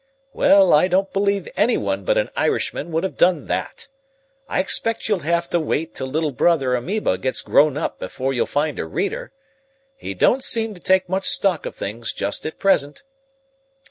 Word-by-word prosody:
"Well, 195 Hz, -2 st, +5 dB
I 150 Hz, +4 st, +5 dB
don't 190 Hz, +2 st, 0 dB
believe 200 Hz, 0 st, 0 dB
anyone -, -, 0 dB
but -, -, +2 dB
an -, -, 0 dB
Irishman 170 Hz, -, -1 dB
would 165 Hz, +2 st, -1 dB
have 190 Hz, -, -4 dB
done 175 Hz, -5 st, +3 dB
that. -, -, -4 dB, 0.6 s
I -, -, 0 dB
expect 225 Hz, +4 st, +2 dB
you'll 210 Hz, -3 st, +1 dB
have 170 Hz, +2 st, -1 dB
to 175 Hz, -, +2 dB
wait 160 Hz, 0 st, -2 dB
till 130 Hz, -, -4 dB
little 155 Hz, +2 st, -1 dB
brother 135 Hz, -2 st, +2 dB
amoeba 125 Hz, -, -1 dB
gets 130 Hz, -, -1 dB
grown 150 Hz, -1 st, +3 dB
up 155 Hz, -, -3 dB
before 135 Hz, +1 st, -3 dB
you'll 125 Hz, -, 0 dB
find 150 Hz, 0 st, -1 dB
a -, -, -2 dB
reader. 190 Hz, -, -3 dB, 0.6 s
He 270 Hz, -, -7 dB
don't 260 Hz, +2 st, +2 dB
seem 225 Hz, -3 st, 0 dB
to 180 Hz, -, -14 dB
take 185 Hz, 0 st, +2 dB
much 190 Hz, +2 st, -2 dB
stock 185 Hz, -5 st, 0 dB
of -, -, -8 dB
things 115 Hz, +3 st, -5 dB
just 100 Hz, +8 st, -3 dB
at 155 Hz, -, -7 dB
present. 145 Hz, -7 st, +1 dB
170 Hz, 180 wpm, -21 LUFS, 145-195 Hz, 0.6 s, Well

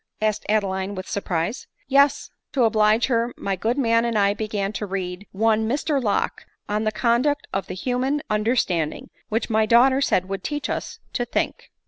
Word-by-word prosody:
asked 215 Hz, 0 st, -1 dB
Adeline 195 Hz, -2 st, 0 dB
with 185 Hz, 0 st, -6 dB
surprise. 185 Hz, +3 st, -2 dB
" -, -, -38 dB
Yes. 280 Hz, +1 st, +3 dB, 0.2 s
To 260 Hz, -, +3 dB
oblige 215 Hz, 0 st, +4 dB
her, 235 Hz, -1 st, 0 dB
my 195 Hz, -1 st, -2 dB
good 225 Hz, +7 st, -1 dB
man 230 Hz, -3 st, +3 dB
and 235 Hz, -2 st, 0 dB
I 200 Hz, -1 st, +3 dB
began 205 Hz, -1 st, -3 dB
to 210 Hz, -, -4 dB
read 185 Hz, 0 st, -4 dB
one 220 Hz, +2 st, +2 dB
Mr 285 Hz, +2 st, 0 dB
Locke 205 Hz, -3 st, -1 dB, 0.2 s
on 210 Hz, +1 st, -1 dB
the 215 Hz, -, +2 dB
conduct 250 Hz, +6 st, +1 dB
of 195 Hz, -, -2 dB
the 180 Hz, -, -5 dB
human 260 Hz, +8 st, -1 dB
under 215 Hz, +3 st, +1 dB
standing; 170 Hz, -10 st, -1 dB, 0.2 s
which 225 Hz, +2 st, -1 dB
my 220 Hz, 0 st, +3 dB
daughter 260 Hz, +4 st, +5 dB
said 185 Hz, -8 st, +2 dB
would 195 Hz, -1 st, -4 dB
teach 295 Hz, -1 st, -3 dB
us -, -, -4 dB, 0.2 s
to 245 Hz, -, 0 dB
think." -, -, -2 dB
215 Hz, 185 wpm, -23 LUFS, 200-245 Hz, 0.2 s, daughter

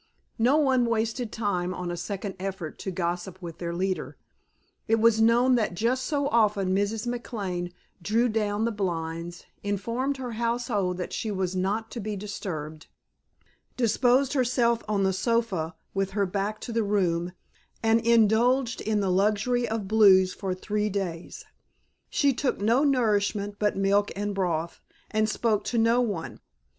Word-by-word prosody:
No 250 Hz, +6 st, +4 dB
one 260 Hz, -5 st, +3 dB
wasted 230 Hz, +1 st, -1 dB
time 185 Hz, -5 st, -1 dB
on 180 Hz, -1 st, -4 dB
a -, -, -3 dB
second 195 Hz, +3 st, -4 dB
effort 190 Hz, -4 st, -5 dB
to -, -, -4 dB
gossip 175 Hz, +1 st, -3 dB
with 170 Hz, -3 st, -8 dB
their 170 Hz, -1 st, -3 dB
leader; 185 Hz, +2 st, -2 dB, 0.7 s
it 225 Hz, -, +4 dB
was 225 Hz, 0 st, +4 dB
known 240 Hz, +3 st, +4 dB
that 220 Hz, -7 st, +1 dB
just 245 Hz, +7 st, 0 dB
so 285 Hz, -2 st, 0 dB
often 205 Hz, -6 st, +2 dB
Mrs. 205 Hz, +3 st, 0 dB
McLane 200 Hz, -7 st, -3 dB, 0.3 s
drew 225 Hz, +7 st, +2 dB
down 215 Hz, -1 st, 0 dB
the 230 Hz, -, 0 dB
blinds, 170 Hz, -3 st, -4 dB, 0.2 s
informed 230 Hz, +7 st, -2 dB
her 255 Hz, -2 st, -5 dB
household 230 Hz, -5 st, -1 dB
that 180 Hz, -, -5 dB
she 220 Hz, -, -2 dB
was 190 Hz, -2 st, -2 dB
not 205 Hz, +4 st, -1 dB
to 240 Hz, -, -5 dB
be 210 Hz, 0 st, -3 dB
disturbed, 160 Hz, -6 st, -6 dB, 0.9 s
disposed 250 Hz, +3 st, +3 dB
herself 240 Hz, -3 st, +2 dB
on 205 Hz, -2 st, +1 dB
the 190 Hz, 0 st, +2 dB
sofa 190 Hz, -6 st, 0 dB, 0.2 s
with 195 Hz, 0 st, 0 dB
her 200 Hz, -, +3 dB
back 200 Hz, +3 st, -2 dB
to -, -, -6 dB
the 230 Hz, 0 st, +1 dB
room 180 Hz, -4 st, 0 dB, 0.5 s
and 225 Hz, +1 st, +4 dB
indulged 235 Hz, +2 st, +3 dB
in 215 Hz, -1 st, 0 dB
the 190 Hz, -2 st, +1 dB
luxury 215 Hz, +6 st, +1 dB
of 220 Hz, -3 st, -3 dB
blues 190 Hz, -3 st, +5 dB
for 190 Hz, -2 st, -3 dB
three 210 Hz, +2 st, -1 dB
days. 185 Hz, -4 st, -4 dB, 0.6 s
She 285 Hz, -4 st, +2 dB
took 255 Hz, +2 st, -1 dB
no 230 Hz, +7 st, +3 dB
nourishment 205 Hz, -6 st, +1 dB
but 210 Hz, -2 st, +1 dB
milk 200 Hz, +1 st, +2 dB
and 205 Hz, +1 st, -2 dB
broth 170 Hz, -4 st, -2 dB, 0.3 s
and 215 Hz, -1 st, +1 dB
spoke 215 Hz, -1 st, 0 dB
to 240 Hz, -, -1 dB
no 230 Hz, +2 st, +4 dB
one. 205 Hz, -9 st, -3 dB
210 Hz, 155 wpm, -27 LUFS, 190-230 Hz, 0.9 s, blues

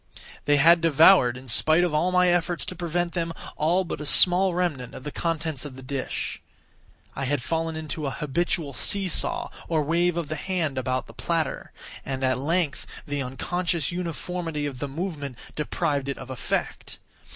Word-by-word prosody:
They 145 Hz, 0 st, +4 dB
had 165 Hz, +3 st, +6 dB
devoured, 160 Hz, -5 st, +6 dB
in 130 Hz, +1 st, -12 dB
spite 155 Hz, +9 st, +4 dB
of 175 Hz, -3 st, 0 dB
all 170 Hz, +4 st, +2 dB
my 180 Hz, 0 st, +4 dB
efforts 175 Hz, 0 st, +1 dB
to 185 Hz, -, -5 dB
prevent 175 Hz, 0 st, -2 dB
them, 165 Hz, -2 st, -2 dB, 0.2 s
all 170 Hz, +5 st, +2 dB
but 170 Hz, -, -5 dB
a -, -, -5 dB
small 180 Hz, +2 st, +6 dB
remnant 155 Hz, -9 st, -2 dB
of -, -, -9 dB
the 150 Hz, -, -5 dB
contents 160 Hz, -4 st, -2 dB
of 145 Hz, -3 st, -8 dB
the 130 Hz, -, -11 dB
dish. 135 Hz, 0 st, -4 dB, 0.7 s
I 135 Hz, -, -2 dB
had 135 Hz, -1 st, -1 dB
fallen 165 Hz, +2 st, -1 dB
into 155 Hz, -1 st, -4 dB
an 135 Hz, -, -3 dB
habitual 150 Hz, 0 st, -1 dB
see 195 Hz, -, +2 dB
saw, 180 Hz, -, -1 dB, 0.2 s
or 160 Hz, -2 st, +1 dB
wave 170 Hz, +3 st, +1 dB
of 170 Hz, -3 st, -2 dB
the 155 Hz, -, -3 dB
hand 165 Hz, -7 st, -2 dB
about 130 Hz, -2 st, -1 dB
the -, -, -14 dB
platter; -, -, -2 dB, 0.3 s
and, 135 Hz, -1 st, -4 dB
at 130 Hz, -1 st, +1 dB
length, 155 Hz, 0 st, -1 dB, 0.2 s
the 145 Hz, -1 st, -2 dB
unconscious 170 Hz, +6 st, -1 dB
uniformity 170 Hz, -2 st, -3 dB
of 135 Hz, -3 st, -5 dB
the 145 Hz, -, -3 dB
movement 145 Hz, -4 st, -5 dB, 0.2 s
deprived 145 Hz, -2 st, -1 dB
it 140 Hz, -, -3 dB
of 130 Hz, 0 st, -8 dB
effect. 130 Hz, -, -3 dB
155 Hz, 180 wpm, -25 LUFS, 140-175 Hz, 0.7 s, had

